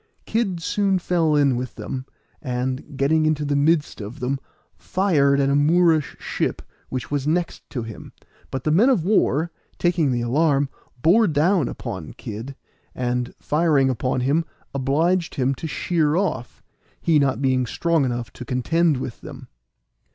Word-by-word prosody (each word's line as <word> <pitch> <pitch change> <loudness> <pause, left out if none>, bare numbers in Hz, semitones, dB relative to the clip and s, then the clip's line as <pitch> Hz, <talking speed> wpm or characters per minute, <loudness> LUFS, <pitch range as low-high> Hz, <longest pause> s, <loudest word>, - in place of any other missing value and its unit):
Kid 195 -7 -1
soon 200 0 +1
fell 170 -3 +1
in 140 -3 +3
with 125 +1 -4
them, 130 0 -5 0.3
and, 130 +2 -3
getting 155 +3 +3
into 150 -1 0
the 145 0 0
midst 150 -2 +1
of 105 +4 -8
them, 130 +2 -1 0.4
fired 140 - +2
at 140 0 +2
a - - +3
Moorish 160 +1 +3
ship - - -2 0.3
which 130 +1 -5
was 145 -1 -1
next 170 +2 -2
him; 115 -5 -6 0.4
but 135 -1 -4
the 155 - +1
men 210 - +5
of 210 -12 +2
war, 170 - +2 0.3
taking 170 -5 +2
the 120 -1 0
alarm, 140 +3 +2 0.3
bore 210 +7 +5
down 160 0 +2
upon - - -6
Kid, 115 +6 -7 0.4
and, 125 0 -2
firing 150 -4 +2
upon 130 +1 -1
him, 145 +6 +2 0.3
obliged 160 +6 +1
him 135 -2 +1
to 150 +5 -6
sheer 155 0 0
off, 165 -10 -2 0.4
he 160 -3 +3
not 135 -4 +1
being 130 -2 +1
strong 165 +4 +1
enough 120 -2 -3
to - - -8
contend 150 +5 +1
with 125 -2 -6
them. - - -10
145 Hz, 155 wpm, -23 LUFS, 130-165 Hz, 0.4 s, men